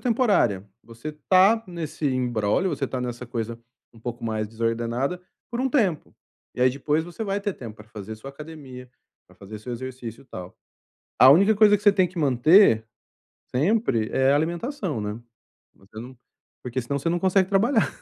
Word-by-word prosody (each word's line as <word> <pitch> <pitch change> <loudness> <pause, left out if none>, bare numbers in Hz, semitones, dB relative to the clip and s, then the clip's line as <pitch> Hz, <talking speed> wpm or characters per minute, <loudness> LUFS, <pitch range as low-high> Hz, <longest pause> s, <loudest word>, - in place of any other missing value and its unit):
temporária. 210 - +1 0.2
Você 115 +7 -8 0.2
tá 195 +5 +5
nesse 165 -4 -4
imbróglio, 125 - 0
você 140 - -2
tá 130 0 -4
nessa 125 0 -5
coisa 115 0 -4 0.4
um 115 - -16
pouco 120 +1 -6
mais 110 -1 -2
desordenada 115 +8 -2 0.3
por 240 0 -3
um 265 - +1
tempo. 205 - 0 0.4
E - - -6
aí 125 - +6
depois 145 +4 -1
você 175 +6 -6
vai 200 0 -2
ter 200 -2 -3
tempo 110 -4 -9
pra 105 0 -15
fazer 110 0 -8
sua 120 +5 -10
academia, 140 -4 -11 0.4
pra - - -21
fazer 105 +2 -10
seu 120 +4 -7
exercício, 125 -1 -7
tal. 90 -5 -9 0.6
A 130 - +9
única 195 +9 +6
coisa 210 0 +6
que - - -17
você 205 -1 +6
tem 185 -2 +3
que 180 +1 -9
manter 135 - +5 0.7
sempre 145 - +1
é 135 +1 +3
a - - +4
alimentação, 170 - -2
né. 105 +2 -4 0.6
Você 100 +3 -13
não 125 +3 -10 0.5
porque 125 +1 -3
senão 140 +4 -2
você 140 - -2
não 175 +1 +1
consegue 190 0 +2
trabalhar. 220 +4 +2
135 Hz, 175 wpm, -24 LUFS, 115-185 Hz, 0.7 s, A